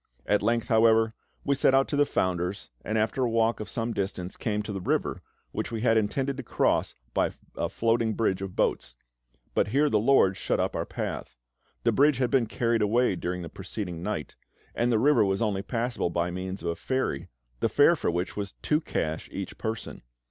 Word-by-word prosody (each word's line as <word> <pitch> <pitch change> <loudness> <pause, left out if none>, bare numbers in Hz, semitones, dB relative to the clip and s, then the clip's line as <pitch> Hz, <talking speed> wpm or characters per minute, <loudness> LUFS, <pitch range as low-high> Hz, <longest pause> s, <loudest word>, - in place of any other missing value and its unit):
At 105 - +2
length, 115 +2 +1
however, 110 0 +4 0.3
we 140 - +3
set 135 -1 +3
out 135 0 +4
to - - -1
the 145 0 +3
founder's, 90 -1 -1
and 110 - -1
after 110 +4 +1
a 120 - +2
walk 115 0 +2
of 110 - -6
some 115 0 -2
distance 95 -2 -3
came 105 -2 -2
to 105 - -5
the 95 - -4
river, - - -1 0.3
which - - -3
we 115 -2 -3
had 115 -1 +3
intended 130 +6 0
to - - -3
cross 125 - +1 0.2
by - - +2 0.3
a - - -1
floating 115 -1 +1
bridge 95 -4 0
of 95 -2 -5
boats; 60 - 0 0.6
but - - +2
here 145 +7 +2
the 105 - +4
LORD 105 -5 +4
shut - - -1
up - - 0
our - - -2
path. - - -5 0.5
The - - +4
bridge 145 -1 +4
had 125 -1 0
been 125 -4 +3
carried 115 0 0
away 110 0 +3
during 90 +1 -3
the - - -5
preceding 90 0 -6
night, 85 -7 -4 0.4
and 120 +1 +1
the 115 - +4
river 145 +2 +4
was 95 -1 +1
only 105 -4 0
passable 120 -2 -1
by 85 +1 -1
means 95 0 -5
of 85 - -1
a 85 - -1
ferry, 130 - -2 0.3
the - - +1
fare - - +5
for - - -1
which 85 +2 -2
was 100 -1 -4
two 150 +1 +2
cash 80 - -3
each - - -5
person. 110 0 -4
110 Hz, 205 wpm, -27 LUFS, 95-120 Hz, 0.6 s, fare